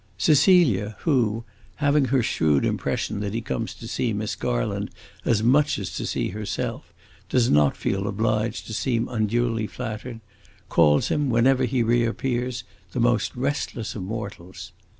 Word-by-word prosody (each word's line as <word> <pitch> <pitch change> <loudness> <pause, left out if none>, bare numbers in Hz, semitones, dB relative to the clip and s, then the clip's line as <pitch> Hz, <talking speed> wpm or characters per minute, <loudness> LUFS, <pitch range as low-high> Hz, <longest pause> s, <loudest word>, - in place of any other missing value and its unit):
Cecilia, 145 - +4
who, 115 -7 +1 0.3
having 145 -1 +2
her 130 -2 +2
shrewd 75 -8 +2
impression 105 - -1
that 100 +1 -3
he 115 - -1
comes 115 0 -4
to 115 - -9
see 115 -1 -1
Miss 105 +1 -2
Garland - - -2 0.4
as 110 -2 +2
much 145 +4 +3
as 95 -2 -5
to - - -3
see - - -1
herself, 105 +1 -4 0.4
does 125 -2 +2
not 75 -1 +4
feel 100 +1 -1
obliged 110 +2 -1
to 110 - -7
seem 115 0 0
unduly 115 0 0
flattered, 115 0 -6 0.5
calls 75 -3 +4
him, 145 -2 +1
whenever 130 +2 +3
he 125 0 +1
reappears, 120 +1 0 0.3
the - - -2
most 120 -2 +1
restless 125 -3 -2
of 105 - -6
mortals. 100 -3 -7
115 Hz, 150 wpm, -24 LUFS, 105-125 Hz, 0.5 s, Cecilia